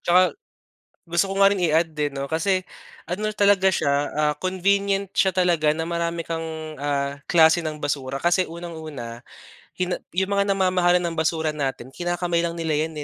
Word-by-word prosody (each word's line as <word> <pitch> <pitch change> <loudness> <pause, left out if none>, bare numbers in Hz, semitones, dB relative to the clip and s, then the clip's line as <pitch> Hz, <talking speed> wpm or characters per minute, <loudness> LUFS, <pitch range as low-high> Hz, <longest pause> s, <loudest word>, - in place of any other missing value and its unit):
tsaka, 180 +1 +4 0.8
gusto 170 +4 +1
ko - - -3
nga 195 - +8
rin 200 -2 -1
i-add 160 0 +2
din, 150 -2 -1
'no? 140 - -2
Kasi, 185 +5 +1 0.5
ano 210 +5 -2
talaga 200 -2 +4
siya, 145 -5 +1 0.2
ah, 150 0 +1
convenient 195 +2 +1
siya 190 - +3
talaga 175 -4 +2
na 160 +1 -3
marami 170 -1 -2
kang, 160 -1 -5
ah, 140 0 -2
klase 165 0 +5
ng 155 -1 -4
basura, 135 -2 -2
kasi, 175 +2 +3
unang-una, 155 -9 -8 0.6
hina 180 0 0 0.2
'yong 190 +2 0
mga 200 0 +2
namamahala 185 -2 +3
ng 170 -1 -3
basura 160 -1 0
natin, 135 -4 -3
kinakamay 175 0 -1
lang 170 0 -3
nila 160 -2 -1
'yan, 160 -1 -6
170 Hz, 165 wpm, -23 LUFS, 155-185 Hz, 0.8 s, nga